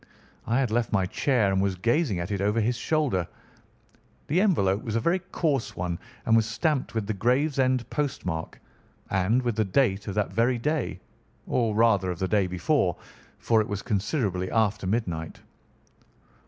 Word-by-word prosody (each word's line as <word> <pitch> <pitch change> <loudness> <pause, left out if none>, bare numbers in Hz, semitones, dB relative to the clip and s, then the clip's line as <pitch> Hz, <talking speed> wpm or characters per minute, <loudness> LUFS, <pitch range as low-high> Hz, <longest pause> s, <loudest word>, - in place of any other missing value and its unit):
I 120 +3 +2
had 130 -5 0
left 120 +1 0
my 95 -3 +2
chair 110 0 +1
and 95 0 +1
was 100 -1 0
gazing 115 - +1
at 85 +3 -4
it 100 -2 -1
over 105 +3 +1
his 115 +3 +1
shoulder. 125 - 0 1.0
The 170 +6 +2
envelope 105 - +2
was 115 -4 -3
a - - +3
very 170 +10 +1
coarse 155 -8 -2
one 90 -1 -3 0.3
and 115 - +4
was 110 -1 +3
stamped 130 +3 -1
with 110 -2 -1
the 110 - -2
Gravesend 130 +2 +1
postmark 90 - -3 0.5
and 100 +7 +2
with 120 -3 -1
the 110 - +3
date 100 0 +1
of 100 - -4
that 105 -3 -1
very 120 +4 +2
day, 150 +6 -2 0.5
or 115 -4 0
rather 105 -5 +3
of 90 - -3
the 95 - -1
day 100 -1 +2
before, 90 - +1 0.4
for 115 -2 +2
it 105 - -3
was 100 -1 -4
considerably 100 - -1
after 110 -3 +1
midnight. 90 -7 -2
110 Hz, 170 wpm, -26 LUFS, 95-130 Hz, 1.0 s, and